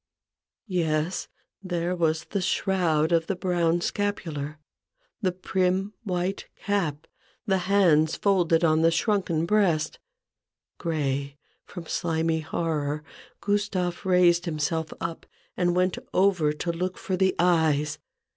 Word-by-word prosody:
Yes; 165 -3 -1 0.3
there 175 -1 -2
was 160 -1 +1
the 200 - -3
shroud 175 -4 +1
of 165 -1 +2
the 195 - -1
brown 175 -2 +1
scapular, 160 -8 -2 0.6
the 185 -4 +1
prim 185 +2 0
white 185 -1 -2 0.2
cap, 170 -8 -1 0.4
the 190 -3 +2
hands 165 -6 +4
folded 175 -5 +2
on 160 -1 +4
the 165 - +5
shrunken 170 -2 +1
breast. 170 -6 +1 0.8
Gray 140 -4 -2 0.3
from 175 -3 -8
slimy 160 -1 0
horror, 155 -2 -2 0.4
Gustave 200 -4 0
raised 180 -1 +4
him 165 -3 -3
self 160 +1 -1
up, 165 0 -5 0.3
and 175 -1 +1
went 185 0 +1 0.2
over 180 -5 +3
to 160 +3 -2
look 180 +2 -3
for 190 - -2
the 190 0 +2
eyes. 155 -4 +2
170 Hz, 120 wpm, -26 LUFS, 160-185 Hz, 0.8 s, the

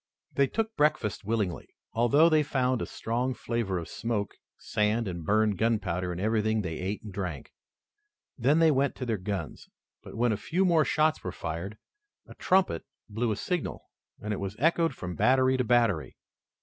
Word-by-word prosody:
They 140 -1 +3
took 225 +5 -2
breakfast 150 -11 +1
willingly, 105 -5 -1 0.3
although 120 +8 +5
they 155 -2 +4
found 130 -3 0
a - - -3
strong 125 +3 -2
flavor 115 -7 -2
of 85 - -5
smoke, 110 -3 -3 0.2
sand, 105 +2 0
and 85 -3 -5
burned 105 +1 +2
gunpowder 95 -6 0
in 90 - -5
everything 110 +1 +1
they 80 -3 -4
ate 95 +3 -3
and 105 -3 -8
drank. 90 -8 -5 0.8
Then 135 +5 +3
they 165 -1 +5
went 140 0 +1
to 130 - -5
their 115 -4 -1
guns, 90 -5 -5 0.3
but, - - -11
when 120 0 +2
a 105 - 0
few 170 - 0
more 165 -4 +4
shots 155 0 +1
were 90 - -3
fired, 85 +7 -5 0.5
a - - -12
trumpet 185 - +1 0.3
blew 110 +2 -1
a - - 0
signal, 175 - -4 0.3
and 105 0 -3
it 100 - -3
was 100 +1 -4
echoed 165 +1 +2
from 90 -4 -5
battery 130 +7 +3
to 130 - +1
battery. 115 -9 +1
115 Hz, 175 wpm, -28 LUFS, 100-135 Hz, 0.8 s, although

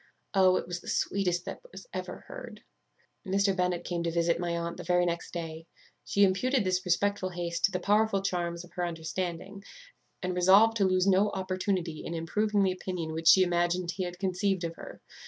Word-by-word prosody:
Oh! 190 -2 +5
it - - -1
was 175 0 -5
the - - -15
sweetest 180 -3 0
that - - -6
was - - -10
ever - - -5
heard. - - -9 0.6
"Mr. 195 -1 +1
Bennet 180 -2 0
came 175 -1 -3
to 170 - -1
visit 170 0 +1
my 170 -1 -1
aunt 170 0 -4
the 175 - -7
very 180 +1 +2
next 170 0 -3
day. 165 -1 -6 0.4
She 200 - +2
imputed 220 +6 +2
this 185 -1 0
respectful 190 +1 0
haste 170 -1 -1
to 195 - 0
the 180 - -1
powerful 205 +1 +2
charms 175 -2 -2
of 180 - -19
her 180 -1 -2
understanding, 175 +4 -5 0.6
and 180 0 -1
resolved 195 +5 +6
to 200 - +3
lose 185 0 +2
no 195 +2 +4
opportunity 185 -3 -2
in 170 - -5
improving 205 +5 0
the 190 - +2
opinion 180 -3 -4
which 160 +1 -3
she 185 +2 +8
imagined 175 0 0
he 185 +2 -3
had 175 0 -6
conceived 190 0 0
of 165 -1 -3
her. - - -11
180 Hz, 195 wpm, -29 LUFS, 170-195 Hz, 0.6 s, she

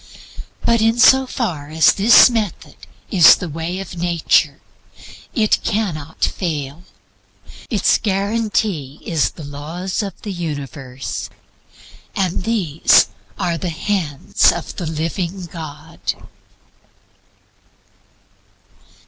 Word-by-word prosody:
But 235 -1 +3
in 225 +1 +2
so 265 +2 +6
far 170 - -3
as 160 +1 +4
this 215 +4 +7
method 225 -6 -3 0.4
is 180 -6 +8
the 180 - -6
way 165 +3 -4
of 195 -2 -7
nature, 170 -1 +1 0.8
it 215 -4 +2
cannot 170 -9 -2
fail. 155 -2 -4 0.8
Its 215 -1 +2
guarantee 200 -7 -1
is 160 -3 +1
the 160 - -12
laws 155 +8 -4
of 195 -3 -6
the 210 - -4
universe 145 -6 -6 0.9
and 185 -1 -1
these 185 -9 +3 0.3
are 175 -3 -1
"the 180 - -3
Hands 165 -4 +1
of 170 - -6
the 175 - -4
Living 170 +4 -3
God." 160 -1 -10
175 Hz, 100 wpm, -19 LUFS, 155-205 Hz, 0.9 s, is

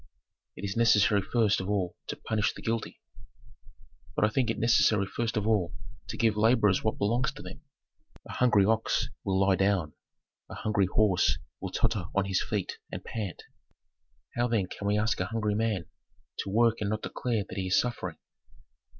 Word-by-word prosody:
"It - - -6
is 100 - -3
necessary 105 -3 +4
first 105 0 +1
of 95 - -5
all 95 -4 -1
to - - -3
punish 105 -1 -1
the - - -10
guilty." 115 0 -3 1.2
"But - - +3
I - - +2
think 120 +1 0
it 115 - -1
necessary 115 -3 +3
first 115 +3 -2
of 105 - 0
all 105 -3 +1 0.3
to - - -5
give 115 -3 +2
laborers 105 -3 +3
what 110 - 0
belongs 120 +8 +1
to - - -10
them. - - -10 0.7
A - - -8
hungry 105 -6 +4
ox 110 +2 +1
will 95 -1 0
lie 95 0 +4
down; 95 -5 +1 0.6
a - - -7
hungry 100 -3 +1
horse 90 -7 +2 0.2
will - - -4
totter 95 -6 0
on 100 0 +2
his 95 -1 0
feet 105 -4 -3
and - - -6
pant. 105 -6 -5 0.9
How, 120 0 +1
then, 115 -5 +1
can 100 +2 -6
we 105 +1 +2
ask 110 +1 0
a 95 - -1
hungry 110 -2 -1
man 105 -5 0 0.5
to - - -3
work 115 +2 +2
and 100 - 0
not 110 0 -2
declare 115 -5 -2
that - - -8
he 95 - -2
is 95 - +4
suffering?" 120 -1 -3
105 Hz, 185 wpm, -29 LUFS, 100-115 Hz, 1.2 s, necessary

